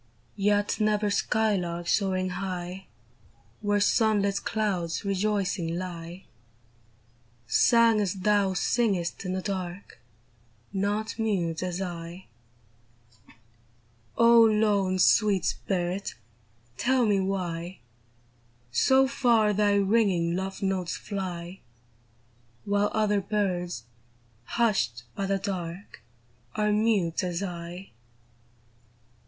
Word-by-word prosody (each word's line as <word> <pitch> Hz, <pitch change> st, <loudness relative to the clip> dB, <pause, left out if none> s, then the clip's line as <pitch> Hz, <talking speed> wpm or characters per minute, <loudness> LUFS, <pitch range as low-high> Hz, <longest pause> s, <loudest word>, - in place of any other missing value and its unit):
Yet 205 Hz, +1 st, +1 dB
never 210 Hz, -1 st, +1 dB
skylark 190 Hz, -6 st, 0 dB
soaring 185 Hz, -2 st, +1 dB
high 185 Hz, 0 st, -5 dB, 0.7 s
Where 205 Hz, -1 st, +1 dB
sun 215 Hz, 0 st, +3 dB
lit 200 Hz, 0 st, -1 dB
clouds 190 Hz, -6 st, -2 dB
rejoicing 195 Hz, -4 st, -1 dB
lie. 175 Hz, 0 st, -7 dB, 1.2 s
Sang 230 Hz, -, +4 dB
as 200 Hz, -2 st, -1 dB
thou 195 Hz, 0 st, +2 dB
singest 195 Hz, -4 st, 0 dB
in 185 Hz, -, -2 dB
the 185 Hz, 0 st, -3 dB
dark, 185 Hz, -1 st, -5 dB, 0.7 s
Not 205 Hz, +3 st, -2 dB
mute 180 Hz, -7 st, -1 dB
as 185 Hz, +1 st, -2 dB
I! 175 Hz, 0 st, -7 dB, 1.9 s
O 235 Hz, 0 st, +7 dB
lone, 210 Hz, -4 st, +2 dB
sweet 200 Hz, -1 st, +3 dB
spirit! 185 Hz, +1 st, -2 dB, 0.6 s
tell 255 Hz, -, +2 dB
me 205 Hz, -2 st, +2 dB
Avhy 180 Hz, -2 st, -3 dB, 0.9 s
So 265 Hz, -, +4 dB
far 235 Hz, -6 st, +2 dB
thy 205 Hz, 0 st, +2 dB
ringing 195 Hz, -5 st, +2 dB
love 190 Hz, +1 st, -4 dB
notes 190 Hz, -3 st, -1 dB
fly, 185 Hz, -3 st, -5 dB, 1.1 s
While 205 Hz, 0 st, +1 dB
other 210 Hz, -2 st, +2 dB
birds, 180 Hz, -, -2 dB, 0.6 s
hushed 195 Hz, -, 0 dB
by 195 Hz, -, -3 dB
the 195 Hz, 0 st, +1 dB
dark, 185 Hz, -, -6 dB, 0.5 s
Are 210 Hz, 0 st, +1 dB
mute 210 Hz, -5 st, +1 dB
as 180 Hz, +1 st, -2 dB
I 175 Hz, +1 st, -7 dB
195 Hz, 95 wpm, -27 LUFS, 180-210 Hz, 1.9 s, O